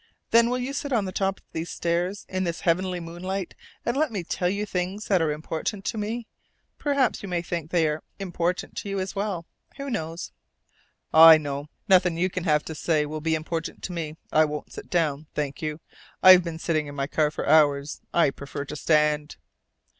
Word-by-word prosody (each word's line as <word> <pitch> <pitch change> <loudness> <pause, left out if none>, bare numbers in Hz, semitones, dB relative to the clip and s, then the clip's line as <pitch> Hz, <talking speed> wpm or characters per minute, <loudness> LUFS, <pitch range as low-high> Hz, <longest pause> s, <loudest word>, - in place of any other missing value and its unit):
Then 235 0 +6
will 250 - 0
you 255 +2 -3
sit 285 0 -3
on 225 -5 +2
the 185 - -4
top 195 +1 0
of - - -30
these 165 +1 -4
steps 175 +4 -1
in 185 0 -2
this 170 -2 -3
heavenly 180 +1 +1
moonlight 175 +3 -5 0.3
and 240 - 0
let 300 -1 +1
me 200 -5 -3
tell 180 +1 -1
you 200 +2 -1
things 190 +2 -3
that 190 -4 +4
are 160 -2 +1
important 160 +6 -4
to - - -2
me? 225 +3 -3 0.5
Perhaps 280 -4 +1
you 200 - -6
may 175 -1 -1
think 170 -2 -4
they 165 -2 +2
are 150 +1 -2 0.2
important 180 -2 -2
to 200 - -4
you 195 0 -2
as 190 +2 -4
well. 195 -4 -2 0.3
Who 275 -1 -5
knows?" 165 -4 -4 0.8
"I 160 0 +10
know. 145 -1 -4 0.2
Nothing 180 -3 +4
you 185 +2 +1
can 185 -1 -4
have 150 -3 +2
to 160 - -5
say 155 -1 +1
will 155 +1 -5
be 160 +1 +1
important 160 +1 -4
to - - -4
me. 160 -3 -4 0.2
I 155 - +5
won't 150 -1 -4
sit - - -9
down, 155 -4 0
thank 145 +1 -3
you. 155 0 -3 0.4
I've 185 -1 +9
been 170 -2 -5
sitting 155 -2 -1
in 145 - -8
my 135 -1 -1
car 150 +1 +1
for 150 - -5
hours. 145 -1 +3
I 170 -5 +3
prefer 140 +1 -6
to 150 - -7
stand." 150 -1 +2
170 Hz, 205 wpm, -26 LUFS, 155-190 Hz, 0.8 s, I